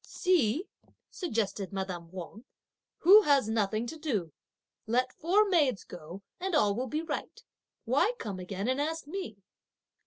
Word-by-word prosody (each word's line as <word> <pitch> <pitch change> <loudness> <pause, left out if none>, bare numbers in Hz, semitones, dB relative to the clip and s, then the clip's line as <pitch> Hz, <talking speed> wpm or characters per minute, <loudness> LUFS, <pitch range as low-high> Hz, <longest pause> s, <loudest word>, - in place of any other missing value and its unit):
"See," 335 - +1 0.4
suggested 215 - -2
madame 185 -4 -4
Wang, 190 +5 -8 0.6
"who 395 +6 +9
has 280 - +3
nothing 220 0 0
to 315 +6 -7
do; 210 - -2 0.5
let 255 +3 +1
four 395 +6 +3
maids 295 - +2
go 175 +3 -10 0.2
and 370 -1 -1
all 210 -9 +4
will 250 +5 -2
be 305 +6 -2
right! 330 - -5 0.4
why 485 - +2
come 200 - -5
again 195 +3 -4
and 260 +2 +1
ask 320 +1 -2
me?" 310 - -6
240 Hz, 145 wpm, -30 LUFS, 200-320 Hz, 0.6 s, who